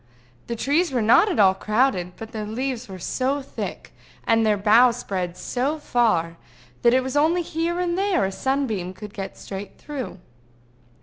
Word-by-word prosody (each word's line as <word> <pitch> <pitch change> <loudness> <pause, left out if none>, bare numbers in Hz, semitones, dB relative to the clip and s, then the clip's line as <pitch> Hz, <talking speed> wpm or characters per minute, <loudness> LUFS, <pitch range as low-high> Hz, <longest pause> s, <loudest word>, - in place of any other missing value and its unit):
The 235 - -3
trees 295 +8 +1
were 245 -4 0
not 235 - +5
at - - -1
all 195 -3 +6
crowded, 205 -3 0
but 225 0 -8
their 215 -3 -5
leaves 250 +1 -3
were 190 - -7
so 260 +9 -1
thick, - - -6 0.3
and 225 0 +3
their 215 -1 +3
boughs 230 +4 +5
spread 185 -6 -4
so 270 +5 -1
far, 215 - +1 0.4
that 235 +1 +5
it 260 - +3
was 260 +1 -4
only 325 +4 +3
here 335 +2 -2
and 350 -1 0
there 385 - +1
a 190 - -2
sunbeam 220 -7 -2
could 210 +1 -9
get 195 -1 -6
straight 195 0 -8
through. 270 -10 -6
235 Hz, 175 wpm, -23 LUFS, 200-280 Hz, 0.4 s, all